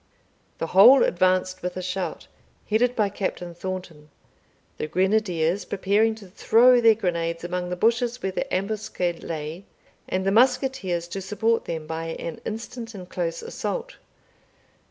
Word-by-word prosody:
The - - -2
whole 245 +8 +8
advanced 185 +1 +1
with 180 +1 -4
a - - -3
shout, 185 0 -4 0.4
headed 240 +4 +2
by 210 -3 +2
Captain 180 -3 -4
Thornton, 175 -4 -7 0.7
the - - -2
grenadiers 185 -1 +1
preparing 205 +4 +1
to 220 -2 -13
throw 240 +6 +5
their 225 -1 +6
grenades 170 -4 -2
among 180 0 -3
the 180 - -2
bushes 235 +5 +1
where 190 - -1
the - - -4
ambuscade 195 -3 -2
lay, 160 +3 -5 0.5
and 185 0 -1
the 195 - +2
musketeers 240 -7 +2
to 195 - -5
support 220 +4 0
them 160 -2 -4
by 165 +1 -4
an 165 - -6
instant 230 +1 -6
and 185 -2 -9
close 170 -2 -3
assault. - - -4
190 Hz, 145 wpm, -24 LUFS, 175-220 Hz, 0.7 s, whole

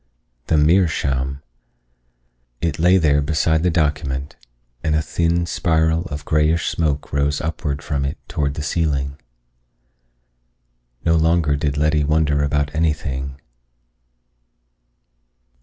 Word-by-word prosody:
The 80 - +2
meerschaum! 70 -5 +1 1.2
It 80 -2 -2
lay 90 +3 +5
there 75 -4 +3
beside 80 +2 +1
the 90 - +2
document, 75 -4 -1 0.5
and 80 -1 +1
a 75 - +2
thin 85 +1 0
spiral 80 -1 +1
of 70 0 -6
grayish 75 +1 +2
smoke 75 -4 -2
rose 70 +1 +1
upward 75 -3 -3
from 70 -4 -2
it 70 - -3
toward 70 -1 -2
the 75 - -4
ceiling. 70 -3 -1 1.9
No 85 0 +4
longer 80 -2 +2
did 70 -1 -1
Letty 75 0 +2
wonder 75 -1 +2
about 75 0 0
anything. 70 -4 -2
75 Hz, 110 wpm, -20 LUFS, 70-80 Hz, 1.9 s, lay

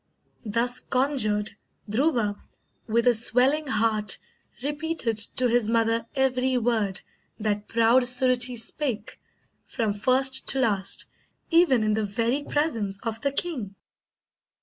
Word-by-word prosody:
Thus 240 +4 0
conjured, 250 -6 -1 0.4
Dhruva, 225 -2 0 0.5
with 230 +1 +1
a 245 - +5
swelling 250 +7 +2
heart 215 -4 +1 0.5
Repeated 290 -6 -2 0.2
to 250 - +2
his 235 -2 +1
mother 230 0 +1
every 260 -1 +1
word 220 -5 -1 0.4
That 210 -1 -2
proud 230 +2 +3
Suruchee 250 -1 +3
spake, 235 0 -4 0.5
from 220 -3 -2
first 260 +4 +1
to 270 - +5
last, 200 -6 0 0.5
Even 330 -9 +4
in 215 0 +1
the 220 +1 0
very 230 +7 -1
presence 230 -11 -2
of 225 -1 -4
the 280 - 0
king. 270 - -1
235 Hz, 120 wpm, -25 LUFS, 215-265 Hz, 0.5 s, a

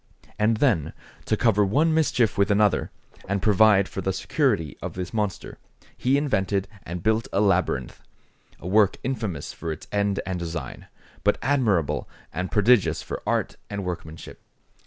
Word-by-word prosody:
And 110 +1 +3
then, 105 - +1 0.3
to 110 - +1
cover 105 -3 +3
one 150 +11 +2
mischief 130 -9 +2
with 100 +1 +2
another, 105 -1 +2 0.4
and 100 0 +1
provide 100 -1 +4
for 95 - -5
the 95 - 0
security 105 - 0
of - - -5
this 90 +1 -5
monster, 105 -3 -3 0.4
he 130 +2 +2
invented 100 -9 0
and 85 0 -7
built 110 +2 +1
a 100 - +1
labyrinth; 95 -10 0 0.6
a - - -13
work 100 +1 +3
infamous 110 - -3
for 80 - -5
its 80 - -7
end 100 -1 0
and 95 -2 -3
design, 85 0 -6 0.4
but - - +3
admirable 115 - +1 0.2
and 90 +2 -3
prodigious 110 0 +3
for - - -6
art - - 0
and 100 -1 -4
workmanship. 80 -3 -7
100 Hz, 155 wpm, -25 LUFS, 90-110 Hz, 0.6 s, provide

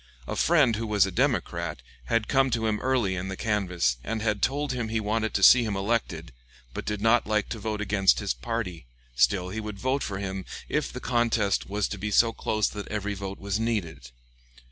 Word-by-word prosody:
A - - -4
friend, 145 -10 +3
who 115 0 -3
was 105 -2 +3
a 95 - -4
Democrat, 90 - -1 0.2
had 115 - 0
come 135 -1 +3
to 115 -2 -1
him 105 -1 0
early 125 -7 +1
in 90 +1 -4
the 95 -1 -5
canvass 90 - 0
and 115 0 -3
had 105 -2 0
told 145 +1 0
him 120 -3 -2
he 110 0 -1
wanted 110 +1 -1
to 100 - +1
see 125 +5 +8
him 105 -3 -2
elected, 95 - -2 0.4
but - - -5
did 105 -1 -3
not 115 +1 +3
like 105 -1 0
to 115 - -5
vote 105 0 -3
against 95 -2 +3
his 100 -2 -1
party; 90 - -4 0.3
still 90 +6 +2
he 110 +4 -4
would 105 -2 -6
vote 130 +6 0
for 100 - -3
him, 95 -1 -4 0.2
if - - -1
the - - -6
contest 115 -5 +1
was 105 0 0
to 100 - -5
be 105 +2 -3
so 115 +2 +4
close 110 -1 0
that 105 -1 -7
every 105 -1 -3
vote 100 0 -6
was 100 +1 -2
needed. 100 - -2
105 Hz, 210 wpm, -27 LUFS, 95-115 Hz, 0.4 s, see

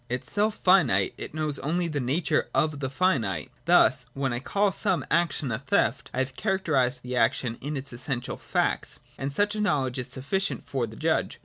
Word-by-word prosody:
Itself 205 - -1
finite, 145 - +3
it - - -7
knows 155 -2 -1
only 170 +4 0
the 150 -3 -2
nature 140 +5 0
of 155 -2 +1
the 135 -2 -2
finite. 125 - 0
Thus, 140 -7 +4
when 135 -2 -1
I 120 - -2
call 200 +9 +1
some 190 -2 0
action 160 -5 +1
a 110 - -1
theft, 135 +1 +1
I - - -7
have 130 0 -1
characterised 145 - 0
the 125 0 -4
action 115 0 +1
in 145 +2 -3
its 135 -1 -7
essential 125 0 -3
facts: - - -1 0.2
and 135 +1 -2
such 205 +8 +1
a 215 - -2
knowledge 135 -10 0
is 125 - -2
sufficient 140 +10 -2
for 130 -4 -2
the 110 - -10
judge. - - 0
140 Hz, 190 wpm, -27 LUFS, 125-175 Hz, 0.2 s, Thus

